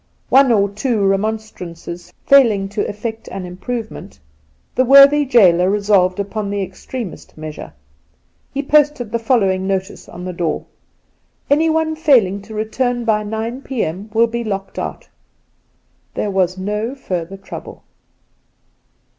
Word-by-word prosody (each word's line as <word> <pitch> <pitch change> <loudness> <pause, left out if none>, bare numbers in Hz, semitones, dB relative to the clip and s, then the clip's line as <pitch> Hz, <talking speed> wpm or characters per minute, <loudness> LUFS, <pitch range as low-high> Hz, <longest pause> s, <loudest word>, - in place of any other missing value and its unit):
One 270 -1 +5
or 200 -3 +3
two 210 +1 -1
remonstrances 195 -4 -3
failing 225 -8 +5
to 205 +1 -2
effect 220 +2 -6
an 190 -2 -6
improvement, 215 - -6 0.5
the 255 - +3
worthy 275 +3 +7
gaoler 185 -8 +5
resolved 200 -2 +2
upon 200 +1 -3
the 200 -1 -1
extremest 190 +2 -8
measure. 155 - -8 0.8
He 280 +1 -3
posted 295 -5 +2
the 235 - 0
following 195 -6 +1
notice 190 0 -3
on 180 +1 -8
the 180 - -4
door: 170 -3 -2 0.4
' - - -43
Anyone 315 +1 +2
failing 240 - +3
to 215 +2 -11
return 240 +3 -1
by 215 -2 +2
nine 220 +4 -4
p.m. 210 -7 -3
will 230 +2 +4
be 235 +1 -3
locked 195 -3 -4
out.' - - -5 1.1
There 205 - -1
was 185 -1 +1
no 210 +6 -3
further 185 -7 -4
trouble. 195 - -10
210 Hz, 130 wpm, -18 LUFS, 190-245 Hz, 1.1 s, worthy